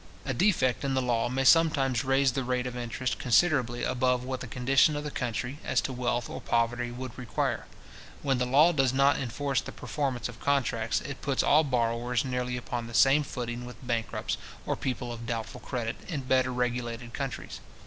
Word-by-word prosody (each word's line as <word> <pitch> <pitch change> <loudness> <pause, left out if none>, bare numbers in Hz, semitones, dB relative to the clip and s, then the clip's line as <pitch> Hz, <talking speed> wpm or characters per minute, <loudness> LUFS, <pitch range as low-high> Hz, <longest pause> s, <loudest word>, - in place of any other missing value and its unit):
A 135 - -1
defect 130 - +2
in 135 -1 0
the - - +3
law 120 -2 +1
may 130 +2 0
sometimes 135 -5 +4
raise 135 0 +3
the 135 +1 -2
rate 125 0 -1
of 125 -1 -4
interest 120 +1 -3
considerably 125 -2 +2
above 125 -1 +1
what 130 0 -3
the 125 - -6
condition 130 +5 +3
of 145 - -3
the 150 - -4
country, 125 +3 -3
as 130 - +1
to 135 - -4
wealth 120 -1 -1
or - - -7
poverty, 120 +1 0
would 125 0 -7
require. 125 -3 -2 0.6
When 135 -3 +1
the 125 - +1
law 145 +7 +6
does 135 -5 +2
not 140 +2 +4
enforce 135 +2 -1
the - - -8
performance 130 -6 -3
of 125 -2 -11
contracts, 125 -5 +1
it 140 -1 -7
puts 140 -2 +1
all 155 +2 +5
borrowers 120 -2 0
nearly 125 -1 -2
upon 120 -1 -4
the 115 - -7
same 135 +5 +6
footing 120 -3 -5
with 125 0 -9
bankrupts, 115 -3 -2 0.3
or - - 0
people 125 -2 -3
of 115 0 -8
doubtful 115 -2 -4
credit, 120 -3 -3
in 155 -6 -3
better 130 0 +2
regulated 125 -1 -2
countries. 135 -2 -5
125 Hz, 190 wpm, -28 LUFS, 120-135 Hz, 0.6 s, law